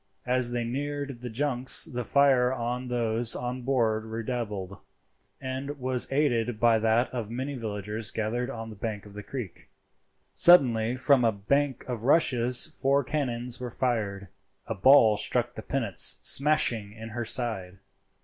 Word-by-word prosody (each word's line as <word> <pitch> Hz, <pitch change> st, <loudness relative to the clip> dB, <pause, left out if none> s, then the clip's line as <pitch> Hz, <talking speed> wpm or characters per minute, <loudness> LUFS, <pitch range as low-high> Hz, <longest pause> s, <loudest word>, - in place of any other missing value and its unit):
As 125 Hz, -1 st, +3 dB
they 120 Hz, -1 st, -2 dB
neared 140 Hz, +1 st, -4 dB
the 125 Hz, -, -6 dB
junks 130 Hz, +1 st, 0 dB
the 125 Hz, 0 st, -5 dB
fire 130 Hz, -2 st, +3 dB
of 125 Hz, 0 st, -3 dB
those 120 Hz, -1 st, +1 dB
on 125 Hz, +1 st, -4 dB
board 115 Hz, -4 st, 0 dB
redoubled, 110 Hz, -4 st, -5 dB, 0.6 s
and 135 Hz, +2 st, -5 dB
was 130 Hz, -1 st, 0 dB
aided 120 Hz, -5 st, 0 dB
by 115 Hz, -1 st, +4 dB
that 115 Hz, +3 st, +2 dB
of 115 Hz, -4 st, -4 dB
many 130 Hz, +5 st, -4 dB
villagers 105 Hz, -2 st, -5 dB
gathered 120 Hz, +3 st, -3 dB
on 115 Hz, -3 st, -7 dB
the -, -, -10 dB
bank 105 Hz, 0 st, -5 dB
of 105 Hz, -, -13 dB
the 105 Hz, -, -7 dB
creek. 115 Hz, -4 st, -8 dB, 0.6 s
Suddenly 125 Hz, -9 st, +5 dB
from 130 Hz, 0 st, +3 dB
a 115 Hz, -, +3 dB
bank 130 Hz, +6 st, -1 dB
of 120 Hz, -3 st, -5 dB
rushes 125 Hz, -4 st, +3 dB, 0.2 s
four 140 Hz, +1 st, +2 dB
cannons 125 Hz, -4 st, -2 dB
were 125 Hz, -1 st, -5 dB
fired. 105 Hz, -6 st, -2 dB, 0.4 s
A -, -, -3 dB
ball 110 Hz, 0 st, +5 dB
struck 120 Hz, +2 st, -1 dB
the 110 Hz, -, -8 dB
pinnace, 115 Hz, -4 st, 0 dB
smashing 140 Hz, -8 st, +2 dB
in 110 Hz, +1 st, -9 dB
her 120 Hz, +2 st, -4 dB
side. 110 Hz, -6 st, -4 dB
120 Hz, 150 wpm, -27 LUFS, 110-130 Hz, 0.6 s, Suddenly